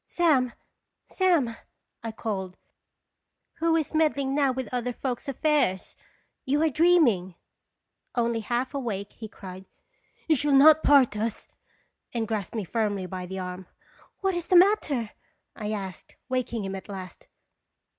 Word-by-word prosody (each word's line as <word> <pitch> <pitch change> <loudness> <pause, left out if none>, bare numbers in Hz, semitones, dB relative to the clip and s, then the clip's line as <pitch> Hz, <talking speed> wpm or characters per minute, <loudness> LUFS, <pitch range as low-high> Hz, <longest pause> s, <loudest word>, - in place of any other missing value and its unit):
" - - -57
"Sam! 280 -8 +3 0.5
Sam!" 335 -12 +1 0.5
I 230 -1 -4
called, 190 -5 -4 1.0
"who 330 0 +2
is 315 -2 -1
meddling 290 -4 +1
now 280 -2 +3
with 260 0 -4
other 250 0 -1
folks' 250 +1 -4
affairs. 275 - 0 0.5
You 290 +4 +1
are 320 - +3
dream 335 +3 +5
ing." 185 -6 0 0.8
Only 235 -1 +1
half 240 +4 -2
awake, 215 -8 -3
he 220 - -8
cried: 190 -2 -10 0.2
* - - -42
' - - -36
You 320 - +4
shall 290 +1 +1
not 305 +3 +8
part 275 -7 +5
us! 220 +1 -3 0.3
" - - -40
and 225 -1 -1
grasped 215 -1 -3
me 220 - -1
firmly 205 -1 -1
by 180 0 -6
the 190 +1 -6
arm. 180 0 -6 0.3
" - - -29
What 385 -1 +1
is 345 -1 -3
the 370 - +3
matter?" 345 - +4 0.4
I 210 -1 -5 0.2
said, - - -19
waking 240 -4 -2
him 195 - -4
at 190 - -9
last. 185 -3 -9
245 Hz, 160 wpm, -26 LUFS, 205-295 Hz, 1.0 s, not